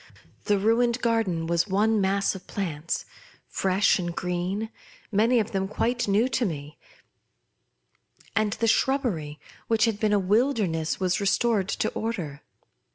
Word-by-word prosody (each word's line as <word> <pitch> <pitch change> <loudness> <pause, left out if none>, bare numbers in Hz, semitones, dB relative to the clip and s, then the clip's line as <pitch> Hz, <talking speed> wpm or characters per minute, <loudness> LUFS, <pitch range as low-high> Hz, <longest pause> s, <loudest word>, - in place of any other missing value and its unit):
The 205 -1 +3
ruined 230 +4 +2
garden 220 -8 0
was 170 +2 +1
one 210 +2 +2
mass 195 +1 +1
of 190 - -10
plants, 170 -5 -3 0.4
fresh 190 +1 +2
and 175 -1 -3
green, 180 +5 -2 0.4
many 225 +4 +3
of 220 0 -2
them 195 -2 -1
quite 240 +4 -1
new 205 +5 +3
to 245 0 0
me; 150 -6 -4 1.6
and 215 -2 +1
the 230 - -1
shrubbery, 220 - 0 0.3
which 225 0 +3
had 220 -3 -1
been 215 -1 +1
a - - +5
wilderness, 200 - +1
was 185 0 0
restored 200 -1 +1
to - - 0
order. 175 -11 -4
200 Hz, 140 wpm, -26 LUFS, 180-225 Hz, 1.6 s, a